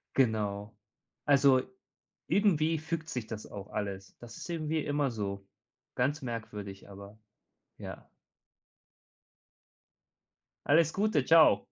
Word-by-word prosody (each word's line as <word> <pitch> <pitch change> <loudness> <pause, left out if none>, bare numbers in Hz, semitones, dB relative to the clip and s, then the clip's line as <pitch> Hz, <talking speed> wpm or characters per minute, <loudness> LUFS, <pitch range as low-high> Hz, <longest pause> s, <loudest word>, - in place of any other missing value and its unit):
Genau, 105 -4 0 0.5
also, 140 -2 +5 0.7
irgendwie 165 -6 +2
fügt 160 0 -4
sich 125 -7 -4
das 110 -2 -6
auch 100 -1 -8
alles, 100 -2 -5
das 115 -1 -11
ist - - -8
irgendwie 155 -2 -1
immer 145 -2 0
so. 100 -3 -4 0.5
Ganz 140 +4 0
merkwürdig, 105 -5 -6
aber, 100 +2 -12 0.6
ja. - - -9 2.6
Alles 160 +2 +4
Gute, 200 -8 +2
tschau. 155 -11 +6
125 Hz, 100 wpm, -31 LUFS, 105-155 Hz, 2.6 s, tschau